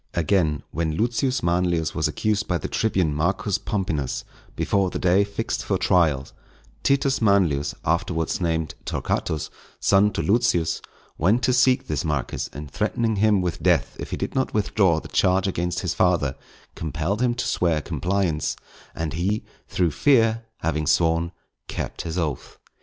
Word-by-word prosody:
Again, 80 -3 +1
when 80 0 -1
Lucius 120 +4 0
Manlius 85 -1 +1
was - - +1
accused 110 0 -1
by 90 - +1
the 75 - -4
tribune 95 -8 +1
Marcus 95 +6 0
Pomponius, 80 - -2 0.3
before 100 -2 +1
the - - -4
day 95 +2 +3
fixed 100 0 -3
for - - 0
trial, 75 -7 +2 0.5
Titus 135 -1 +2
Manlius, 95 -9 +2
afterwards 85 0 0
named 80 -2 -1
Torquatus, 75 -2 -2 0.3
son 100 +1 +4
to - - -2
Lucius, 100 -7 +2 0.4
went 105 +10 +3
to 125 - +3
seek 125 +1 +3
this 75 -2 -2
Marcus, 75 -5 -2
and 75 0 -8
threatening 110 - 0
him 105 -1 +3
with 90 -2 -3
death - - +2
if - - -5
he - - -3
did - - -3
not 130 -4 -1
withdraw 100 -5 +2
the - - -10
charge 95 0 +2
against 90 -1 -1
his 90 - -1
father, 85 -7 +2 0.4
compelled 80 - -2
him 120 -1 +2
to 125 - -2
swear 85 -3 +1
compliance; 90 +1 -1 0.4
and 80 -1 -3
he, 95 +6 -1 0.2
through 90 -3 +1
fear, 115 - +3 0.2
having 75 -1 -1
sworn, 85 +1 +2 0.4
kept - - -4
his 85 +1 -4
oath. 80 -6 -3
90 Hz, 155 wpm, -24 LUFS, 80-105 Hz, 0.5 s, son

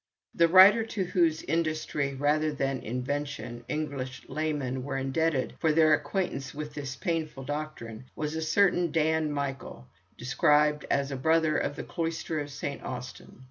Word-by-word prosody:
The 170 - +4
writer 190 +6 +8
to 220 -3 -3
whose 170 -3 +1
industry, 155 -3 -1
rather 150 +3 +1
than 135 -2 -1
invention, 125 -1 -4
English 140 -5 -4
laymen 145 -5 -2
were 135 0 -3
indebted 135 +1 0
for 160 - +3
their 155 0 +5
acquaintance 145 -2 -2
with 150 0 -6
this 140 -3 -5
painful 155 0 -3
doctrine 130 -5 -6
was 150 0 -3
a 160 - -2
certain 175 +1 +2
Dan 160 -1 +1
Michael, 135 - -4 0.3
described 150 +3 +2
as 140 0 +1
a - - -2
brother 160 +3 +2
of 145 - -1
the - - -5
Cloister 165 -1 -3
of 145 0 -4
Saint 140 0 -5
Austin. 125 0 -8
150 Hz, 150 wpm, -28 LUFS, 135-160 Hz, 0.3 s, writer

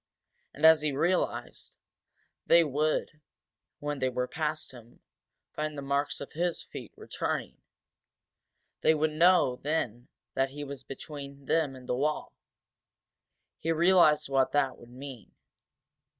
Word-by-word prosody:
And, 150 - +1
as 160 -1 +8
he 150 -1 0
realized, 170 +7 -1 0.7
they 170 0 +7
would, 155 +1 -1 0.6
when 145 -1 -4
they 130 - +1
were 125 0 -2
past 155 +1 -3
him, 120 -2 -15 0.5
find 155 -1 -3
the 140 - -5
marks 140 +1 -1
of 140 - -8
his 175 +1 -1
feet - - -9
returning. - - -4 1.2
They 160 - +4
would 155 +1 +1
know 165 -5 +4
then 125 -6 -2 0.3
that 135 0 +1
he 145 +2 -7
was 140 -2 -7
between 140 0 -9
them 150 -2 +1
and 125 -1 -12
the - - 0
wall. 150 +4 -1 1.3
He 165 - -1
realized 165 -3 +5
what 135 -1 +2
that 135 -3 +1
would 120 - -14
mean. 130 -3 -10
145 Hz, 135 wpm, -29 LUFS, 135-155 Hz, 1.3 s, as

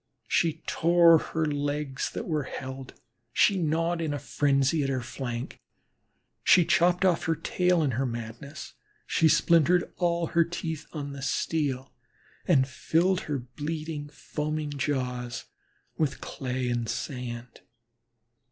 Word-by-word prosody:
She 160 -1 +1
tore 170 -1 +5
her 160 0 -2
legs 145 -1 -2
that - - -5
were 155 -5 -1
held; 130 0 -7 0.4
she 195 - +4
gnawed 165 +1 0
in 150 -3 -1
frenzy 140 +2 +1
at 135 - 0
her 130 -2 -1
flank, 120 0 -5 0.8
she 180 -3 +6
chopped 180 +1 +3
off 175 -3 +2
her 165 - +2
tail 180 0 +1
in 140 - +1
her 130 +3 0
madness; 120 +5 -7 0.3
she 160 - +3
splintered 170 +2 +4
all 170 -1 +1
her 170 - +5
teeth 160 -2 -5
on 145 -3 -5
the 140 - -7
steel, 135 -1 -1 0.5
and 135 -7 +4
filled 165 +6 +1
her 145 - 0
bleeding, 150 +4 -5
foaming 150 +1 -4
jaws 125 -4 -2 0.5
with 150 -4 0
clay 130 -1 -3
and 120 -2 -1
sand. 120 -2 -5
150 Hz, 130 wpm, -28 LUFS, 130-165 Hz, 0.8 s, she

